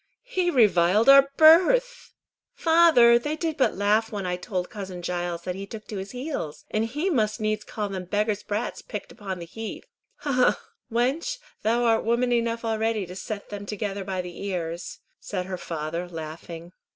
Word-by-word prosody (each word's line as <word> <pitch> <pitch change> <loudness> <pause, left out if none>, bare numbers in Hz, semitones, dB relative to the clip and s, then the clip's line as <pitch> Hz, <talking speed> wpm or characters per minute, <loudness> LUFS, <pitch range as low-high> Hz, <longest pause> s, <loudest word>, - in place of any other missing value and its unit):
"He 370 -8 0
reviled 210 - +4
our 275 0 +8
birth." 485 +11 +5 0.4
"Father! 320 -8 +6
they 295 +5 -3
did 320 0 -2
but 265 - +2
laugh 210 +3 +2
when 200 -3 -4
I 180 0 -1
told 180 0 -4
cousin 190 -5 -7
Giles 175 -1 -3
that 180 - -3
he 195 +2 -7
took 215 0 -9
to 210 - -4
his 190 +1 -5
heels, 250 - -5
and 215 +1 +1
he 295 +11 -2
must 215 -6 +1
needs 215 0 -1
call 210 -2 -4
them 190 -2 -5
beggars' 210 +2 0
brats 210 +4 -3
picked 210 - -7
up - - -17
on 190 -2 -4
the 170 - -7
heath." 225 +6 -7 0.4
"Ha! 290 -1 -2
ha! 255 -1 +3 0.3
wench, 270 - 0 0.2
thou 235 +2 +1
art 225 -1 +3
woman 235 +2 +1
enough 230 -1 0
already 220 -2 0
to 180 +1 -10
set 200 +2 -6
them 205 -1 -7
together 200 -1 -3
by 190 -1 -3
the 175 +1 -8
ears," 175 -3 -4 0.2
said 185 -3 -4
her 185 0 -4
father, 165 +2 -4
laughing. 165 +1 -8
215 Hz, 185 wpm, -25 LUFS, 185-245 Hz, 0.4 s, our